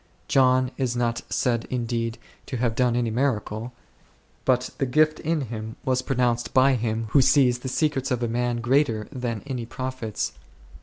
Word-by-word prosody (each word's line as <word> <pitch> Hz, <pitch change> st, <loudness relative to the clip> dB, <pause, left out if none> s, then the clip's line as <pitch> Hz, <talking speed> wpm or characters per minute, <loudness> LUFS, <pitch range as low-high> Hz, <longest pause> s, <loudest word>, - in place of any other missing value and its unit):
John 130 Hz, -1 st, +3 dB
is 125 Hz, -3 st, -1 dB
not 120 Hz, -1 st, 0 dB
said 120 Hz, -2 st, 0 dB
indeed 115 Hz, -2 st, -2 dB, 0.3 s
to 130 Hz, -, -3 dB
have 120 Hz, -1 st, 0 dB
done 125 Hz, 0 st, +2 dB
any 120 Hz, -2 st, 0 dB
miracle; 115 Hz, -2 st, -1 dB, 0.7 s
but 125 Hz, -1 st, +2 dB
the 135 Hz, -, +1 dB
gift 155 Hz, +4 st, +3 dB
in 160 Hz, -1 st, 0 dB
him 110 Hz, -3 st, -6 dB
was 130 Hz, -1 st, +1 dB
pronounced 125 Hz, -2 st, 0 dB
by 135 Hz, +1 st, +6 dB
Him 115 Hz, -2 st, -1 dB
Who 140 Hz, -, +6 dB
sees 125 Hz, -2 st, +4 dB
the 130 Hz, -, -5 dB
secrets 145 Hz, -1 st, 0 dB
of 125 Hz, -2 st, -1 dB
a -, -, +1 dB
man 120 Hz, 0 st, -1 dB
greater 120 Hz, -4 st, +2 dB
than 120 Hz, -5 st, -4 dB
any 125 Hz, -4 st, -4 dB
prophet's. 130 Hz, -3 st, -3 dB
125 Hz, 165 wpm, -25 LUFS, 115-130 Hz, 0.7 s, by